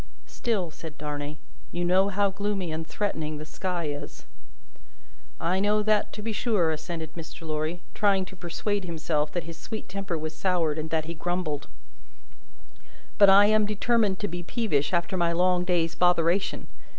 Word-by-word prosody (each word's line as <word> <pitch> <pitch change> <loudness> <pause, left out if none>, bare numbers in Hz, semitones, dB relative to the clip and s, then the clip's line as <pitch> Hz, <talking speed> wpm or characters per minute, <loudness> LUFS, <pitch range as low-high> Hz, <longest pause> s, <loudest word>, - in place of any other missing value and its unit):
"Still," 200 -8 -2
said 160 0 -9
Darnay, 150 0 -4 0.3
"you 175 0 -1
know 190 +3 +4
how 200 0 +2
gloomy 195 -3 -2
and 160 +1 -4
threatening 155 -7 -2
the 155 - -7
sky 175 +1 -3
is." 145 0 -7 1.1
"I 180 +3 +1
know 210 +1 +3
that, 215 -1 +2
to 210 - -6
be 225 - -1
sure," 200 -5 +2
assented 160 0 -5
Mr. 165 0 -9
Lorry, 155 +3 -2
trying 195 -2 +3
to 190 - -12
persuade 195 +3 -2
himself 155 -3 -1
that 175 - -1
his 165 0 -9
sweet 220 -1 -6
temper 190 -2 -3
was 155 +1 -4
soured, 170 -5 +1
and 155 +1 -4
that 160 -1 0
he 165 - -4
grumbled, 170 -3 -2 1.5
"but 200 -1 +9
I 200 +1 +8
am 215 0 +4
determined 210 -1 +2
to 205 - 0
be 175 -1 -4
peevish 175 - 0
after 175 +1 0
my 170 -1 +2
long 180 +1 +3
day's 170 -2 +1
botheration. 180 +2 +2
175 Hz, 165 wpm, -27 LUFS, 160-200 Hz, 1.5 s, but